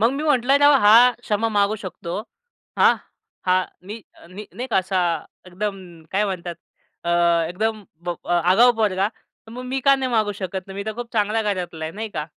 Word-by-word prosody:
मग 230 +2 +4
मी 280 +2 -3
म्हटलं 275 -3 +3
राव 290 0 +6
हा 205 - +7 0.3
क्षमा 225 -1 -1
मागू 200 +2 +2
शकतो, 175 -1 -6 0.6
हां. - - +6 0.5
हा 180 - +4 0.3
मी 205 - -6 0.4
मी 205 +3 -9
नाही 250 - -5
का 230 - 0
असा 185 0 -1 0.5
एकदम 195 +2 -4 0.3
काय 205 +2 +2
म्हणतात 180 -3 -4 0.5
अ, 170 - -1 0.4
एकदम 215 +4 -2 0.5
आगाऊ 185 +8 +5
पोरगा 200 -2 +1
तर 225 0 -23
मग 250 +2 -7
मी 265 +1 -2
का 275 +1 +5
नाही 260 -1 -2
मागू 215 -2 +1
शकत? 190 0 -4
नाही, 195 - -9
मी 200 - -4
तर 220 - -2
खूप 240 0 -7
चांगल्या 215 +1 +1
घरातला 180 -6 -3
आहे 160 - -5
नाही 220 +2 -5
का. 150 0 -2
210 Hz, 185 wpm, -22 LUFS, 185-230 Hz, 0.6 s, हा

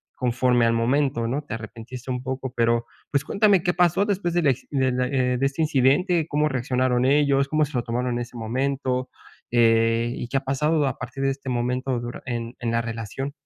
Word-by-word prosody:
conforme 125 -1 +2
al 115 - +2
momento, 120 +1 +1
¿no?, 135 +5 -1
te 115 - -5
arrepentiste 115 +3 -8
un 125 0 -2
poco, 130 -1 -4
pero, 115 0 +2 0.3
pues, 140 0 +1
cuéntame, 200 -2 +3
¿qué 175 -1 +1
pasó 180 +3 +3
después 185 -4 -1
del 175 -4 +2
acci 130 - -2
del, 130 -3 +1
eh, 125 -1 +1
de 135 - +2
este 140 +4 -1
incidente? 155 +4 +2
¿Cómo 150 +1 +2
reaccionaron 125 -2 0
ellos, 140 0 +3
cómo 155 +1 +2
se 145 - -12
lo 120 - +2
tomaron 125 +1 -2
en - - -1
ese 120 0 -7
momento? 130 +2 -1 0.4
Eh, 115 0 +3
¿y 120 - -5
qué 135 - -1
ha - - 0
pasado 150 +3 +1
a 130 - -3
partir 135 0 -5
de 135 - +2
este 135 -1 -6
momento 125 +1 -1
dura 120 0 -6
en 120 0 -4
en 120 - -2
la 115 0 +1
relación? 115 +4 -5
130 Hz, 205 wpm, -24 LUFS, 120-140 Hz, 0.4 s, cuéntame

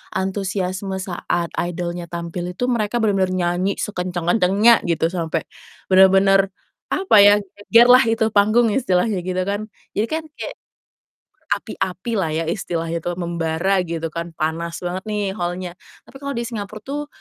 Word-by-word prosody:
antusiasme 190 0 -2
saat 175 -2 -2
idol-nya 175 0 -3
tampil 170 +1 -5
itu 245 - -4
mereka 220 -1 -1
bener-bener 195 -3 +2
nyanyi 180 +2 0
sekencang-kencangnya, 185 +4 +2
gitu, 165 -1 +1
sampai, 165 -3 -2 0.5
bener-bener 195 +1 +6 0.5
apa 380 - +2
ya, 205 0 +8
geger 205 +5 +3
lah 255 - +8
itu 225 0 +1
panggung 215 +3 +4
istilahnya, 200 -3 +1
gitu 185 0 -1
kan, 205 +2 -2 0.3
jadi 215 - +2
kan 320 +4 -2 0.2
kayak, - - -5 0.9
berapi-api 190 +5 -3
lah 165 -5 0
ya 160 - 0
istilahnya 170 -3 -2
tuh, 175 +1 -3
membara 170 +2 -1
gitu 165 -1 -3
kan 170 +1 -6
panas 165 +2 -3
banget 180 +2 -4
nih 210 -2 -1
hall-nya. 175 +1 -4 0.2
Tapi 270 - -17
kalau 280 0 -5
di 235 - -2
Singapura 215 -3 -6
tuh 290 +4 -4
185 Hz, 145 wpm, -21 LUFS, 175-210 Hz, 0.9 s, ya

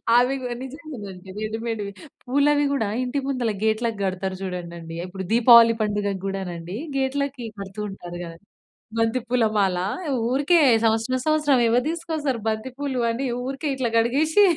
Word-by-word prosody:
అవి 250 +3 +4 0.3
నిజంగానండి 250 -10 -9
రెడిమేడ్‌వి. 220 -1 -3 0.3
పూలవి 290 +3 +3
కూడా 225 -7 0
ఇంటి 255 +3 -1
ముందల 255 -5 0
గేట్‌లకి 220 0 0
కడతారు 190 0 -2
చూడండి. 170 -3 -6
ఇప్పుడు 190 +1 -6
దీపావళి 235 0 +8
పండుగకి 205 -2 -1
కూడానండి 180 -2 -5 0.2
గేట్‌లకి 270 -1 -1
కడుతూ 195 +1 -6
ఉంటారు 175 -3 -8
కదా. 165 0 -9 0.6
బంతి 225 +2 +2
పూల 245 -1 +2
మాల 195 -3 +2 0.5
ఊరికే 290 +7 +3 0.3
సంవత్సరం, 225 +3 +1
సంవత్సరం 300 -4 +3
ఎవరు 245 +2 +3
తీసుకొస్తారు 315 -7 -2
బంతి 220 +4 -2
పూలు 280 -3 -2
అని 240 +4 -2 0.2
ఊరికే 275 +3 -3
ఇట్లా 260 -3 -1
కడిగేసి 295 - +3
230 Hz, 130 wpm, -24 LUFS, 200-270 Hz, 0.6 s, దీపావళి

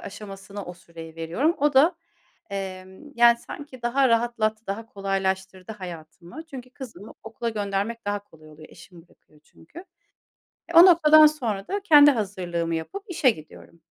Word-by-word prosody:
aşamasına 200 0 -9
o 180 - -9
süreyi 165 -2 -13
veriyorum. 200 - -1
O 290 +1 +2
da, 315 +7 +5 0.6
emm, 190 +7 -8
yani, 235 -1 +5
sanki 260 0 -11
daha 260 +2 +2
rahatlat 230 -2 0
daha 210 +3 -5
kolaylaştırdı 190 -1 -3
hayatımı. 175 - -10
Çünkü 255 -4 -10
kızımı 245 -5 -11
okula 225 +1 -5
göndermek 205 +2 -3
daha 205 0 -2
kolay 155 -4 -19
oluyor. 155 +1 -15
Eşim 170 -2 -16
bırakıyor 155 -3 -27
çünkü. 165 - -17 0.9
E, 340 - -9
o 335 +2 +9
noktadan 310 -3 +7
sonra 230 -10 -4
da 405 +1 -2
kendi 295 -5 +7
hazırlığımı 180 -7 -3
yapıp 390 - -6
işe 315 -8 +2
gidiyorum. 165 -2 -9
205 Hz, 145 wpm, -24 LUFS, 185-260 Hz, 0.9 s, o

